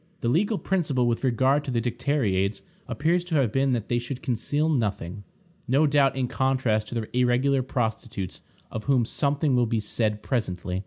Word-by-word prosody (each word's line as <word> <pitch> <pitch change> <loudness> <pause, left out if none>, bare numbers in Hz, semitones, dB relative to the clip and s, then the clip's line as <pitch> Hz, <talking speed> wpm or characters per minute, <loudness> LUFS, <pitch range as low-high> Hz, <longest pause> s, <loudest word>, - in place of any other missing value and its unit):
The 115 - 0
legal 200 - +2
principle 150 -12 0
with 120 +1 0
regard 130 +3 +2
to 145 - -6
the 120 -2 +1
dicteriades 115 -5 0 0.2
appears 170 +4 +1
to 175 -3 -2
have 130 -7 +2
been 135 +1 +2
that 115 -3 -2
they 120 - +1
should 125 +2 -6
conceal 145 +5 0
nothing; 105 - -1 0.4
no 140 +5 +4
doubt 140 -2 +3
in 130 -2 0
contrast 130 -5 0
to 120 - -7
the 115 0 -4
irregular 125 +2 +3
prostitutes, 110 -6 -3 0.3
of 110 - -5
whom 130 -4 +3
something 140 +2 0
will 120 -1 +3
be 115 0 0
said 105 0 -1
presently. 90 -7 -2
125 Hz, 175 wpm, -26 LUFS, 110-140 Hz, 0.4 s, no